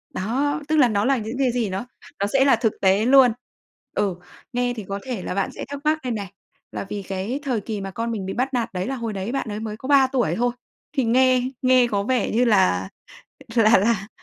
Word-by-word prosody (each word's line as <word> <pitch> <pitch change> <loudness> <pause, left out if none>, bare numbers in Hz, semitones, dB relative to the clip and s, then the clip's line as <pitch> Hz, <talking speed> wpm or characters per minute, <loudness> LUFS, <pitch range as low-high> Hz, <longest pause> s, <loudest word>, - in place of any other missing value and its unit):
Đó, 275 +10 -1
tức 315 - +1
là 270 -4 +6
nó 205 -1 +1
là 275 0 +3
những 225 +2 -5
cái 260 -2 +2
gì 235 -4 -1
nó 190 +5 -4 0.3
nó 200 - +1
sẽ 270 0 +4
là 275 - +6
thực 225 -2 0
tế 195 +3 +3
luôn. 260 -1 +7 0.6
Ừ, 195 -3 0 0.4
nghe 245 0 0
thì 220 -4 -7
có 200 0 -3
thể 245 -7 -4
là - - -3
bạn 195 - -1
sẽ - - -6
thắc 285 0 -5
mắc 310 +1 +2
đây 250 - -2
này, 200 -5 -4 0.4
là - - -5
vì 205 - -4
cái 195 +8 -3
thời 250 -6 -1
kỳ 210 -1 -5
mà 195 0 -5
con 230 +4 -3
mình 205 -4 -4
bị 190 - -4
bắt 260 +3 -1
nạt 235 -3 -1
đấy 185 +2 -3
là 270 - -2
hồi 230 -3 -4
đấy 195 +3 -4
bạn 270 -4 -2
ấy 210 0 -4
mới 215 -1 -5
có 260 - -8
3 275 -2 +6
tuổi 260 -2 0
thôi. 245 +1 +1 0.5
Thì 265 - +3
nghe 255 +2 +4 0.2
nghe 255 -1 +4
có 200 -3 -1
vẻ 245 0 0
như 240 +3 +2
là 95 - +3 0.7
là 225 0 +6
là 205 0 0
230 Hz, 245 wpm, -23 LUFS, 200-255 Hz, 0.7 s, luôn